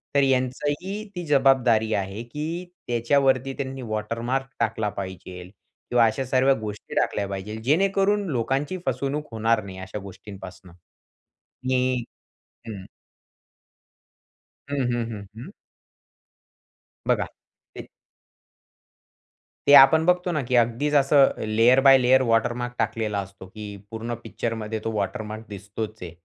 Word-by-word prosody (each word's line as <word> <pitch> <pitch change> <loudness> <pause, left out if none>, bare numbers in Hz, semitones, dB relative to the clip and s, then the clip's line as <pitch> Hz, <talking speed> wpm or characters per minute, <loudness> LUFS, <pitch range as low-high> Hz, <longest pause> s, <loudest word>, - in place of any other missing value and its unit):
तर 140 - +5
यांचंही 145 +9 -1
ती 175 -1 -4
जबाबदारी 130 -6 +3
आहे 100 +2 -3
की 155 +8 -5 0.2
त्याच्यावरती 130 +2 +2
त्यांनी 135 -1 -4
वॉटरमार्क 115 +4 -2
टाकला 110 -2 0
पाहिजेल 90 -1 -8 0.4
किंवा 120 -1 +5
अशा 130 +4 0
सर्व 130 +1 +3
गोष्टी 105 -1 -7
टाकल्या 100 - 0
पाहिजे. 100 +2 -5
जेणेकरून 195 - +2
लोकांची 135 +6 -1
फसवणूक 140 +4 -2
होणार 110 0 +1
नाही 95 -1 -9
अशा 95 +3 -6
गोष्टींपासनं. 95 -2 -11 1.0
हं, 130 -1 +1 0.7
हं. 100 -4 -7 1.8
हं, 145 0 -3 0.2
हं, 120 -1 -1
हं, 105 -2 -7
हं. 120 - -8 1.6
बघा - - +2 0.5
ते - - -9 1.8
ते 145 - +7
आपण 160 +4 +6
बघतो 180 0 +2
ना 150 - 0
की 125 - +1
अगदीच 120 +5 +2
असं 140 0 +5 0.2
लेयर 115 +4 +5
बाय 135 - +9
लेयर 130 +1 +5
वॉटरमार्क 120 +2 +1
टाकलेला 105 -3 -1
असतो 100 0 -11
की 105 +1 -8 0.2
पूर्ण 115 +1 -4
पिक्चरमध्ये 110 -1 -4
तो 115 - -2
वॉटरमार्क 110 +1 -4
दिसतोच 105 +2 -6
आहे. 90 -2 -6
120 Hz, 120 wpm, -24 LUFS, 105-135 Hz, 1.8 s, बाय